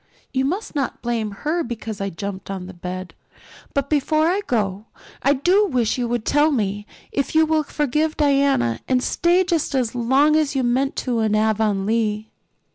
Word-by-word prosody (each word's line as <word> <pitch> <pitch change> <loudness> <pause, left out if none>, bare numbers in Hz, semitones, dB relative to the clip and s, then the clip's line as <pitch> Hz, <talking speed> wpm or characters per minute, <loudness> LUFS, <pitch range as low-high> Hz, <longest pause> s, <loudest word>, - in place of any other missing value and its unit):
You 265 0 +1
must 375 +10 -3
not 280 -4 -3
blame 230 -3 -1
her 305 - -2
because 225 -3 -6
I 195 - -1
jumped 195 +2 -6
on 190 -2 -5
the 190 - -9
bed. 180 +1 -6 0.6
But 280 -1 0
before 310 +1 +2
I 385 +3 +1
go 205 -3 -1 0.4
I 275 - +4
do 365 +9 +3
wish 245 - +1
you 240 - 0
would 235 -1 -2
tell 295 +2 +3
me 205 -5 -1 0.2
if 280 +2 -2
you 320 0 +6
will 315 0 +2
forgive 300 +1 -1
Diana 275 - +2
and 255 -1 +1
stay 350 +2 +2
just 335 -6 -1
as 250 -4 0
long 265 +5 +3
as 305 -3 +1
you 265 - +1
meant 260 +3 +1
to 245 -3 0
in 215 -1 +1
Avonlea." 215 0 0
250 Hz, 180 wpm, -22 LUFS, 215-295 Hz, 0.6 s, you